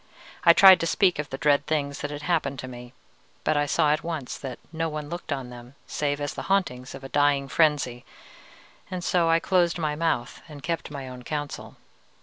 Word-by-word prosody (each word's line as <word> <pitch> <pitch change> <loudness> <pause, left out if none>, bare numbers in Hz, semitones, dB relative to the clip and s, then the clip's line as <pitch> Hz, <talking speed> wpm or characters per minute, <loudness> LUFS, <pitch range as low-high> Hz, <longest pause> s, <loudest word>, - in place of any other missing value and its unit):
I 170 - +8
tried 190 +1 +9
to 165 - -1
speak 180 -2 +2
of 150 - -3
the 135 - -5
dread 145 0 +2
things 140 -2 -1
that 145 - -3
had 145 0 -7
happened 150 -6 0
to 130 - -6
me, 125 0 -10 0.5
but - - +1
I 145 0 +1
saw 150 +1 +3
at 155 - -2
once 160 -6 -4
that 130 -3 -6 0.2
no 165 0 -1
one 150 -1 -5
looked 175 -1 -6
on 135 -3 -3
them 120 +2 -12
save 145 -1 -2
as 145 -1 -3
the - - -5
hauntings 135 -11 0
of 135 - -11
a 135 - -7
dying 145 -1 +2
frenzy, 145 -5 +1 0.9
and 180 -1 -5
so 170 -2 +2
I 165 0 +4
closed 175 -1 +2
my 155 -3 -1
mouth 155 -6 -1
and 145 -2 -11
kept 165 +2 -3
my 140 -3 -7
own 125 -1 -9
counsel. 145 +2 -5
145 Hz, 210 wpm, -26 LUFS, 135-165 Hz, 0.9 s, tried